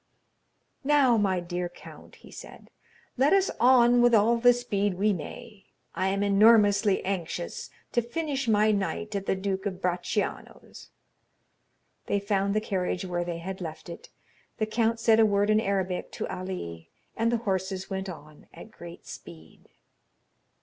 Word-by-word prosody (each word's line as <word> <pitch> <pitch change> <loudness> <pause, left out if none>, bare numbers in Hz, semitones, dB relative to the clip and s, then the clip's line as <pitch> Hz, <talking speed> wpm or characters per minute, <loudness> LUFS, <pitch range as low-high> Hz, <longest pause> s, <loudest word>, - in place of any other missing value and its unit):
"Now, 275 -4 +4
my 195 -4 +1
dear 175 0 -4
count," 175 - -14
he - - -17
said, - - -12 0.5
"let 275 +6 +3
us 390 -1 +3
on 245 -1 +5
with 240 -1 +5
all 225 +3 +4
the 245 +1 +6
speed 205 -5 -1
we 205 +3 +2
may. 210 +4 -9 0.3
I 185 - -1
am 195 +1 0
enormously 205 0 +4
anxious 175 -2 -4 0.2
to 240 - +2
finish 275 +2 -3
my 215 0 +3
night 205 +1 -2
at 195 -1 -4
the - - +1
Duke 190 +1 -3
of 185 -2 -5
Bracciano's." 180 +3 -4 1.2
They 200 - +1
found 200 0 -1
the - - +3
carriage 185 -3 -2
where 175 -1 -2
they 175 -1 -4
had 190 +3 -7
left 160 -1 -7
it. 170 - -10 0.5
The 215 - 0
count 225 +1 0
said 225 -1 +4
a 225 - +6
word 205 +1 +2
in 215 - +4
Arabic 190 -3 -2
to - - -4
Ali, 85 - -7 0.3
and 230 +1 +1
the 240 - +1
horses 190 -1 -2
went 190 0 -3
on 155 -3 -12
at 220 - -12
great 170 -3 -12
speed. 80 -2 -13
200 Hz, 155 wpm, -27 LUFS, 185-225 Hz, 1.2 s, the